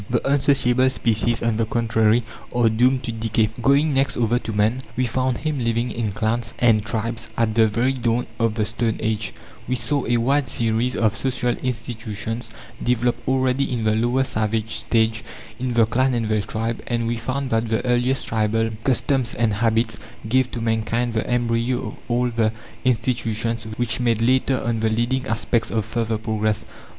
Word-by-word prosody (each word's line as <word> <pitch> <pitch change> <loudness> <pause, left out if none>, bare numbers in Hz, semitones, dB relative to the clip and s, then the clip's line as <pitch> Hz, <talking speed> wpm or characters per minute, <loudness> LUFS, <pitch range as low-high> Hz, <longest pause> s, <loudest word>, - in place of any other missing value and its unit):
The 120 +1 0
unsociable 135 -2 +3
species, 115 -1 0
on 115 -2 +1
the 115 - +1
contrary, 115 0 +2 0.3
are 120 -2 +4
doomed 125 +4 +2
to 120 - -3
decay. 110 -1 0
Going 140 +4 +3
next 135 +1 +1
over 120 +1 +2
to 115 - -5
man, 110 +4 +1 0.2
we 130 - +2
found 130 +1 0
him 155 -3 -2
living 115 0 0
in 115 -3 -2
clans 115 +3 -1
and 110 -3 +4
tribes 115 +2 -3
at 115 -2 +2
the 110 0 +5
very 120 +5 +1
dawn 120 -1 0
of 115 -2 +1
the 110 -2 +1
stone 115 +1 -1
age; 110 -2 -1 0.4
we 125 - 0
saw 130 +4 0
a 120 +1 +2
wide 135 +4 +2
series 115 +1 0
of 110 -1 +1
social 125 +1 0
institutions 115 -2 -4 0.3
developed 120 0 0
already 130 +1 +1
in 120 -3 -1
the 110 0 +2
lower 120 +4 +2
savage 110 -2 -1
stage, 110 -1 +1 0.4
in 125 -1 -1
the 115 -1 +5
clan 130 +3 +1
and 115 -2 -1
the 110 -1 +2
tribe; 110 +2 -3
and 120 -1 -1
we 120 +1 0
found 130 +3 -3
that 115 0 +1
the 115 +3 0
earliest 125 +2 +1
tribal 110 0 +1
customs 130 -1 +1
and 110 -1 +1
habits 110 +1 +1 0.3
gave 130 +2 +2
to 120 - -5
mankind 115 +1 0
the 110 - -2
embryo 120 0 0
of - - -9
all 125 +1 +1
the 115 -2 +1 0.3
institutions 115 -2 0
which 120 -1 -1
made 120 -3 +1
later 130 +2 +2
on 115 0 0
the 110 0 +1
leading 120 +4 0
aspects 115 0 0
of 110 -3 -1
further 115 -2 -1
progress. 110 -1 -1
115 Hz, 180 wpm, -22 LUFS, 110-125 Hz, 0.4 s, the